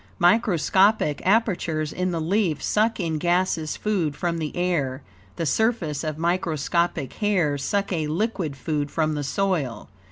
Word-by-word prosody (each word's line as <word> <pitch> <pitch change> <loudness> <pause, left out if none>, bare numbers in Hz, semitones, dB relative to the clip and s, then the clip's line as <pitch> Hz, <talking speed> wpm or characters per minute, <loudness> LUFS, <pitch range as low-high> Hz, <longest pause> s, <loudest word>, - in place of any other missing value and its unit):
Microscopic 190 -3 +3
apertures 175 -8 +1
in 185 0 -1
the 170 -2 -2
leaf 170 -2 0
suck 220 +2 +1
in 160 -4 -1
gaseous 175 -2 0
food 180 -9 -1
from 170 +1 -2
the 155 -2 -4
air; 145 -7 -1 0.3
the 165 - -2
surfaces 175 - 0
of 155 -1 -3
microscopic 170 -3 0
hairs 170 -10 0
suck 200 +2 -1
a 160 -3 -1
liquid 175 -2 -1
food 145 +1 -2
from 155 0 0
the 145 -1 -2
soil. 140 - -1
170 Hz, 140 wpm, -24 LUFS, 150-195 Hz, 0.3 s, Microscopic